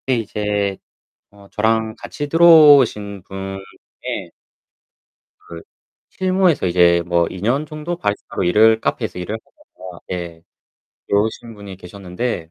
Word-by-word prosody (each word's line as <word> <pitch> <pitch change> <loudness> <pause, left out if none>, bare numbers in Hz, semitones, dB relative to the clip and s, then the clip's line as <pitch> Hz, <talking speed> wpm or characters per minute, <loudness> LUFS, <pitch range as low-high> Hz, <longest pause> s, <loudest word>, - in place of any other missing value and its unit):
그때 130 -2 -1
이제 105 -2 -2 0.5
어 100 -1 -18
저랑 110 +1 0
같이 145 +5 -6
들어오신 145 - +5
분 95 0 -7 0.4
중에 - - -5 1.2
그 85 -1 -9 0.5
실무에서 185 - +1
이제 85 -1 +3
뭐 85 -1 +1
2 95 - -9
년 130 +8 0
정도 155 +3 -6
바리스타로 105 - -3
일을 110 +5 +4
카페에서 90 - -3
일을 95 +5 -4
하다가 90 -4 -15
예 85 -2 -6 0.7
들어오신 110 +3 -1
분이 100 -2 -10
계셨는데 90 0 -6
105 Hz, 260 characters per minute, -19 LUFS, 90-125 Hz, 1.2 s, 들어오신